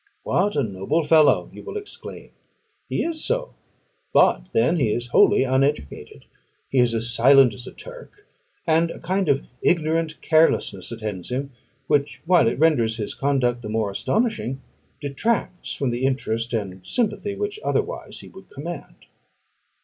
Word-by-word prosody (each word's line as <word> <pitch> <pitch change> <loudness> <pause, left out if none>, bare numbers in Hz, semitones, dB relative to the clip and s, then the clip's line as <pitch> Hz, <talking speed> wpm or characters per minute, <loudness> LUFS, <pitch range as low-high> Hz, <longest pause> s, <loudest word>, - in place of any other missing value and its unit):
"What 200 +3 +1
a 145 - +2
noble 105 - -1
fellow!" 155 0 +4
you - - -10
will 420 0 -6
exclaim. 410 -1 -9 0.6
He - - 0
is 325 -2 -3
so; - - -2 0.6
but - - +4
then 180 -6 +2
he 125 -9 +1
is 120 +2 -3
wholly 120 - +5
uneducated: 130 - -1 0.5
he 135 - +2
is 120 -2 +3
as 115 +1 -1
silent 135 0 +6
as 125 +3 -10
a - - -7
Turk, - - -12 0.4
and 165 0 +3
a - - -7
kind 185 0 -1
of 140 -1 +2 0.2
ignorant 160 -1 +1
carelessness 155 - +2
attends 105 -6 -5
him, 135 +3 -3 0.3
which, 140 -4 0
while 170 -7 +4
it 115 - 0
renders 125 -8 +2
his 105 -3 -4
conduct 130 -4 0
the 105 - -6
more 110 -2 -1
astonishing, 200 - -1 0.4
detracts 180 +7 -2
from 135 -3 -1
the 120 +2 -3
interest 120 -3 -1
and 95 -5 -4
sympathy 205 - -1
which 415 +1 -4
otherwise - - -2
he - - -12
would 190 0 -15
command. 150 +1 -8
140 Hz, 155 wpm, -23 LUFS, 120-175 Hz, 0.6 s, silent